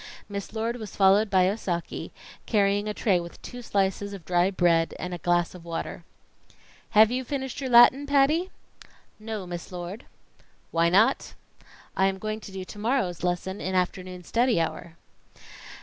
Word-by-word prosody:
Miss 200 -1 -6
Lord 225 +2 -2
was 215 -4 -8
followed 200 +2 +4
by 185 -2 +4
Osaki, 185 -3 -3 0.4
carrying 205 -1 +2
a 210 - -2
tray 195 -6 +2
with 170 0 -9
two 245 0 -8
slices 200 -2 -1
of 190 -5 -9
dry 175 +1 +2
bread 170 -3 +2
and 180 0 -5
a 175 - -5
glass 175 +1 +1
of 180 -2 -11
water. 165 -1 -5 0.9
"Have 220 +1 +8
you 255 +1 -1
finished 265 +1 -4
your 265 - -3
Latin, 255 +4 +7
Patty?" 290 +6 +3 0.7
"No, 215 -3 -5
Miss 175 +1 -7
Lord." 180 +6 -7 0.7
"Why 165 0 +3
not?" 200 +6 +2 0.6
"I 190 - +3
am 195 0 -1
going 215 +2 -4
to 210 - -11
do 190 -1 -6
to 205 - -10
morrow's 220 -6 0
lesson 180 +2 -2
in 185 0 -2
afternoon 180 0 -2
study 235 0 +2
hour." 165 +1 -3
195 Hz, 165 wpm, -26 LUFS, 180-225 Hz, 0.9 s, Have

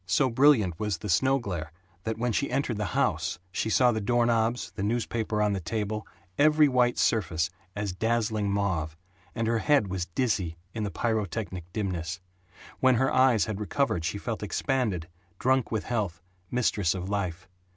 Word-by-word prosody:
So 130 +6 +2
brilliant 115 - +4
was 105 -4 -1
the 105 +5 -6
snow 130 +10 +3
glare 90 - -4 0.3
that 110 -1 -2
when 120 +1 0
she 140 +6 0
entered 130 -5 -1
the 105 - -1
house - - +1
she 110 - -1
saw 125 +2 +4
the 110 -1 -2
door 120 +3 +2
knobs, 115 +1 +1
the 100 - -6
newspaper 110 0 0
on 105 -1 +2
the 100 - -1
table, 105 +4 -3 0.3
every 150 0 +6
white 125 -2 +2
surface 85 -6 +1 0.2
as 105 -2 -2
dazzling 110 0 0
mauve, 85 -6 -1 0.4
and 115 - -1
her 115 0 +1
head 140 -6 +3
was 90 -1 -2
dizzy 90 -5 -1 0.2
in 110 - -4
the 105 - -1
pyrotechnic 100 -3 -2
dimness. 90 -5 -3 0.6
When 130 -1 +5
her 130 +3 +2
eyes 130 -5 +4
had 105 -2 -4
recovered 105 - 0
she 85 +5 -2
felt 110 +2 -4
expanded, 105 - -1 0.3
drunk 130 +1 +2
with 110 -3 -1
health, 105 -8 -2 0.3
mistress 105 -7 +1
of 90 0 -4
life. 95 -3 -3
110 Hz, 170 wpm, -28 LUFS, 95-120 Hz, 0.6 s, every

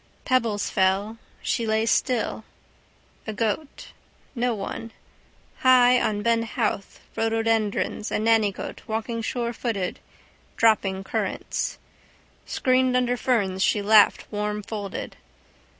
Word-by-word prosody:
Pebbles 230 -6 +1
fell. 195 +4 +1 0.2
She 230 - -1
lay 220 0 +1
still. 230 -1 0 0.8
A 220 - -3
goat. 225 +7 -3 0.4
No 240 -1 0
one. 220 +3 -6 0.7
High 250 -1 +6
on 205 -1 -1
Ben 230 0 +2
Howth 215 -3 -3
rhododendrons 225 -2 0
a - - +1
nannygoat 220 -2 +1
walking 225 +1 -3
surefooted, 230 -5 -2 0.6
dropping 195 -4 +2
currants. - - -3 0.7
Screened 255 0 +2
under 245 0 +1
ferns 205 -7 0
she 205 +1 +2
laughed 210 0 +5
warmfolded. 210 -1 -4
225 Hz, 100 wpm, -25 LUFS, 205-235 Hz, 0.8 s, High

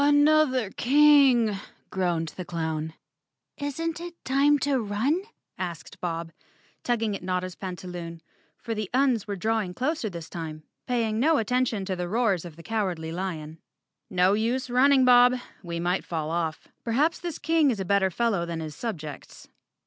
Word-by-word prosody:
"Another 290 -6 +4
king," 275 -4 +5 0.4
groaned 175 -4 0
the 185 - -7
clown. 160 -2 -3 0.6
"Isn't 325 +4 -3
it 345 0 -7
time 280 +3 +4
to 275 -1 +2
run?" 225 - 0 0.4
asked 175 -4 -6
Bob, 165 -1 -3 0.5
tugging 225 -4 0
at - - -7
Notta's 180 0 -2
pantaloon, 175 -3 -7 0.3
for 230 - -4
the 215 -3 -3
Uns 255 -6 +2
were 200 - -2
drawing 210 -2 -1
closer 265 -3 -1
this 170 -3 -7
time, 155 -2 -6 0.2
paying 225 -3 0
no 310 +5 +4
attention 230 -3 0
to 190 -1 -2
the 175 -1 -4
roars 205 -5 +1
of 165 -3 -9
the 165 - -13
Cowardly 185 -7 -2
Lion. 165 -3 -5 0.5
"No 185 +1 +3
use 240 +4 0
running, 260 +1 +5
Bob. 250 0 +7 0.3
We 170 -2 -5
might 175 +2 0
fall 160 -2 -3
off. 165 -2 -2 0.2
Perhaps 285 +8 +1
thid 345 -4 -5
King 320 -1 +3
is 225 -5 -1
a 190 - -2
better 195 0 +3
fellow 200 -1 0
than 170 -1 -4
his 155 -2 -6
subjects. 155 - -7
205 Hz, 155 wpm, -26 LUFS, 175-255 Hz, 0.6 s, Bob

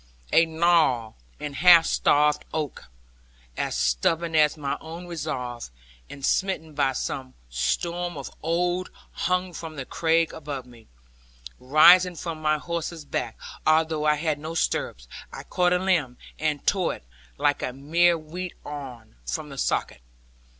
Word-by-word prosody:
A 165 - +6
gnarled 160 -9 +2 0.3
and 145 -2 -5
half 175 -1 +8
starved 150 0 +3
oak, 150 -3 -4 0.7
as - - -2
stubborn 165 - +1
as 150 0 +4
my 140 -2 -2
own 165 +2 -8
resolve, 135 - -5 0.4
and 140 -1 -6
smitten 185 -5 0
by 140 -2 +1
some 130 0 -4 0.2
storm 170 - -1
of 140 - -7
old, 175 +3 0 0.2
hung 180 0 -1
from 160 -1 -7
the 135 -2 -5
crag 165 +2 +1
above 145 -4 -6
me. 120 -2 -17 0.7
Rising 175 +7 +6
from 165 -1 -5
my 155 0 +2
horse's 170 0 -5
back, 120 -4 -3 0.3
although 155 -1 +2
I 150 0 +4
had 150 -1 -1
no 160 +2 -6
stirrups, - - -1 0.2
I - - -8
caught 180 -1 +1
a 180 - +4
limb, 175 -10 0 0.2
and 150 -2 -1
tore 190 -3 +1
it - - -16 0.3
(like 145 - +1
a - - -2
mere 165 +6 +2
wheat 170 +3 -7
awn) 130 - -8
from 105 - -3
the 135 - -9
socket. - - -1
155 Hz, 145 wpm, -25 LUFS, 140-170 Hz, 0.7 s, half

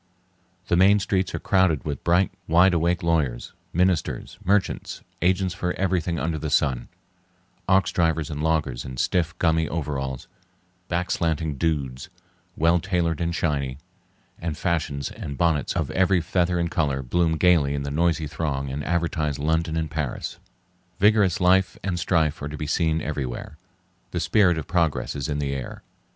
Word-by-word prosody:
The - - +2
main 95 +3 +6
streets 95 -2 -1
are - - -3
crowded 95 -8 +2
with 75 -3 -4
bright, 90 +3 +3 0.2
wide 90 +3 +5
awake 85 +1 +1
lawyers, 75 -8 0 0.2
ministers, 90 0 0
merchants, 100 +1 0 0.2
agents 90 +1 +2
for 90 -1 -2
everything 90 -3 0
under 80 -1 -2
the 75 +1 -3
sun; 70 -4 +1 0.8
ox 95 0 +3
drivers 80 -3 0
and 75 0 -4
loggers 75 -6 0
in 65 -1 -8
stiff, 85 +4 0
gummy 80 -2 +2
overalls; 70 -5 -3 0.6
back 90 0 -1
slanting 80 -2 0
dudes, 70 -4 -2 0.5
well 85 +2 +4
tailored 85 -3 -1
and 85 0 -1
shiny; 70 -6 -1 0.6
and 80 -3 -3
fashions 75 -5 -1
and 70 -1 -7
bonnets 80 -5 +1
of 80 -3 -1
every 95 +2 +3
feather 90 +1 0
and 85 -1 -1
color 70 -4 0
bloom 80 +4 +1
gayly 75 -5 +3
in 70 - -3
the 70 - -4
noisy 80 +1 +1
throng 70 -2 -3
and 70 +2 -4
advertise 80 -3 -1
London 80 +2 0
and 80 -1 -2
Paris. 75 -5 -4 0.6
Vigorous 105 -3 +4
life 95 +1 +3
and 90 -3 -1
strife 80 -4 +1
are 70 - -4
to 75 - -6
be 75 - -4
seen 80 +1 0
everywhere. 70 -2 -4 0.5
The 90 - -3
spirit 90 -2 +3
of 80 - -4
progress 85 -2 0
is 70 -1 -3
in 75 - -1
the 70 -1 -2
air. 65 -2 -6
80 Hz, 160 wpm, -24 LUFS, 75-90 Hz, 0.8 s, main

